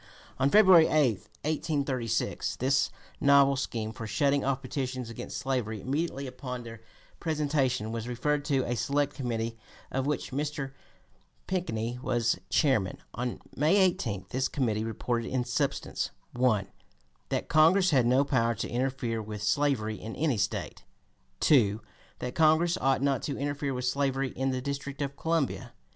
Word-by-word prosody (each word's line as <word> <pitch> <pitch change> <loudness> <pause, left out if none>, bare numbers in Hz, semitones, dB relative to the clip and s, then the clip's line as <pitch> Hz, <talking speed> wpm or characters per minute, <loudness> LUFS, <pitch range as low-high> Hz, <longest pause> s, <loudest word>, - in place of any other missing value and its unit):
On 135 +1 +3
February 185 -4 +7
8, - - +1 0.5
1836, 140 -7 -1
this 130 +1 +2 0.3
novel 140 -1 +5
scheme 115 -4 -3
for 115 0 -7
shutting 140 +7 +2
off 135 0 -1
petitions 130 -2 -3
against 115 - -6
slavery 120 -5 -2
immediately 140 - -2
upon 125 -1 -6
their 115 -1 -10 0.4
presentation 140 -8 0
was 115 0 -4
referred 145 +4 0
to 135 -3 +1
a 120 - -1
select 145 +3 0
committee 115 -3 -3 0.3
of 135 +1 -1
which 150 -1 -2
Mr. 145 0 -3 0.7
Pinckney 120 -10 -2
was 120 -5 +1
chairman. 125 -11 +2 0.2
On 125 0 -3 0.2
May 155 +6 +3
18 175 - +1
this 130 +1 +1
committee 110 -6 -1
reported 115 +1 -2
in 125 -2 -1
substance: - - -1 0.2
1. 120 -5 +2 0.6
That - - -1
Congress 175 +4 +5
had 130 -5 +4
no 130 +3 +4
power 115 -4 +1
to 100 - -3
interfere 125 -2 -1
with 105 -1 -6
slavery 110 -2 +1
in 115 - -6
any 140 -7 0
State; 95 - -2 0.6
2. 110 -8 +4 0.4
That 125 0 -4
Congress 160 +2 +4
ought 135 0 +1
not 140 -2 +1
to 140 - -3
interfere 145 -1 -2
with 125 0 -3
slavery 135 0 0
in 135 +1 -2
the 130 -1 -1
District 140 0 -4
of 140 0 -4
Columbia; 165 -3 0
3. - - -10
130 Hz, 150 wpm, -29 LUFS, 115-145 Hz, 0.7 s, February